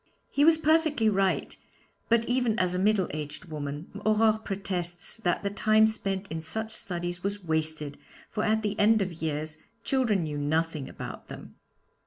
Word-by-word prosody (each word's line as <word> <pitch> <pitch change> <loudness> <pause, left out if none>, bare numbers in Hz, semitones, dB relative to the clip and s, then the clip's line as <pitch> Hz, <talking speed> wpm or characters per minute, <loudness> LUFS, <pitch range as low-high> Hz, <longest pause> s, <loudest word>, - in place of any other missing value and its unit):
He 285 - +3
was 320 +1 +7
perfectly 315 -7 +3
right, 195 -2 +1 0.5
but 230 0 +4
even 245 -2 +1
as 180 -4 +1
a 180 - 0
middle 200 -1 +3
aged 150 +3 -5
woman 150 -1 -5
Aurore 215 0 +4
protests 185 -2 -3
that 180 -5 0
the 200 - -1
time 215 +1 +4
spent 200 -3 -1
in 160 0 -3
such 220 +8 -4
studies 175 -2 -4
was 200 +1 -3
wasted, 155 -3 -1 0.3
for 215 - -2
at 220 0 +2
the 210 0 -2
end 215 0 +5
of 185 -2 -4
years 155 0 -2 0.3
children 235 -9 +2
knew 150 -2 -3
nothing 155 0 0
about - - -8
them. - - -10
195 Hz, 165 wpm, -28 LUFS, 160-220 Hz, 0.5 s, was